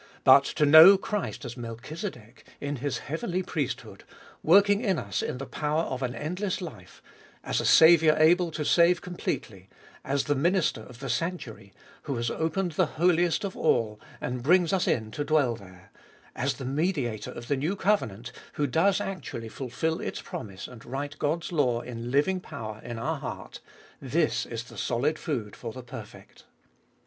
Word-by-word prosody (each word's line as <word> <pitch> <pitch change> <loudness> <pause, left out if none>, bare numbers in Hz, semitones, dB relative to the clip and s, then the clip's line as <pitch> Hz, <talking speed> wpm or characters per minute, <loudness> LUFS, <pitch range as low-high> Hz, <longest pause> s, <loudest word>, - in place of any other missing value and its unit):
But - - +7
to 150 - +3
know 160 +7 +10
Christ 210 +1 -4
as 120 - -6
Melchizedek 120 - -7 0.2
in 145 0 -3
His 140 +1 -2
heavenly 170 +5 -2
priesthood, 150 -6 -4 0.4
working 200 +4 +5
in 195 -7 +1
us 100 -7 -2
in - - -3
the 135 - -5
power 150 +3 -1
of 130 -4 -4
an 125 -1 -2
endless 180 +5 -3
life; 115 - -10 0.4
as - - -1
a - - -4
Saviour 160 -1 +7
able 170 +3 +4
to 155 -2 -4
save 170 +2 +4
completely; 100 - -5 0.3
as 140 +1 0
the 145 - +1
minister 160 - +1
of 125 +3 -13
the 135 - -4
sanctuary, 125 - -4 0.3
who 140 - -2
has 120 0 -1
opened 165 +3 -1
the 165 +2 +1
Holiest 175 0 +2
of 195 -2 -4
All, 105 -2 +1 0.2
and 125 0 -4
brings 175 +6 +3
us 190 - +1
in 110 -2 0
to 145 - -3
dwell 145 -6 +2
there; 95 -3 -15 0.4
as 135 +3 -1
the 135 - -7
Mediator 135 - -1
of 120 - -8
the 140 - +1
new 155 +9 -1
covenant, 125 - 0 0.2
who 150 - 0
does 165 +9 +2
actually 120 -12 -5
fulfil 140 +7 -3
its - - -4
promise 95 -4 -7
and 120 -3 -12
write 145 +3 -5
God's 155 +4 -1
law 125 -8 +1
in 120 -1 -6
living 150 +8 +2
power 110 - -8
in 120 -1 -6
our 115 - -2
heart; - - -7 0.3
— - - -27
this 150 +4 0
is 115 -1 -5
the 120 - -11
solid 140 +6 0
food 115 -9 -4
for 115 - -6
the 130 +2 -9
perfect. 120 - -11
145 Hz, 175 wpm, -27 LUFS, 120-170 Hz, 0.4 s, know